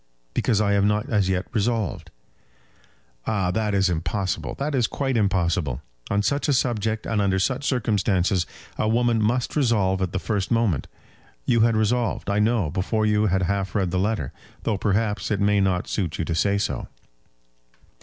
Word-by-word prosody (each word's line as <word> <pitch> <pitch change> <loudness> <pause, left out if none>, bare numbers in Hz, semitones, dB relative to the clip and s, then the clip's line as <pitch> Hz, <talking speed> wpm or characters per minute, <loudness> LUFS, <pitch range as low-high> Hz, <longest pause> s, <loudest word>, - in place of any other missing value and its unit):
"Because 110 -4 +1
I 105 -1 +2
have 100 -1 +3
not 105 +5 +1
as 100 -4 +2
yet 95 0 0
resolved." 110 -2 -1 1.2
"Ah, 95 -5 +1
that 105 0 0
is 95 0 +3
impossible. 90 +3 -2
That 145 +2 -2
is 125 -4 +2
quite 135 -2 -2
impossible. 90 - 0 0.3
On 100 0 +1
such 140 +9 0
a 145 - +3
subject 110 -4 0
and 110 -2 0
under 95 -1 +2
such 130 +9 0
circumstances 95 - +1 0.3
a - - +1
woman 115 0 +2
must 120 +4 0
resolve 105 -9 +2
at 90 -2 -1
the - - -2
first 100 0 -2
moment. 115 - +1 0.6
You 115 - +3
had 115 0 +4
resolved, 110 -1 0
I 100 - +1
know, 105 -7 +2
before 110 +5 0
you 105 0 +2
had 95 0 +1
half 100 +1 -1
read 95 -4 +1
the 90 - 0
letter; 100 - -1 0.3
though, 105 -4 0
perhaps, 105 -1 0
it 105 - 0
may 100 0 +3
not 95 -2 +1
suit 85 -7 -2
you 80 - -1
to 85 - -2
say 100 +5 +2
so." 100 - -2
105 Hz, 175 wpm, -24 LUFS, 95-115 Hz, 1.2 s, had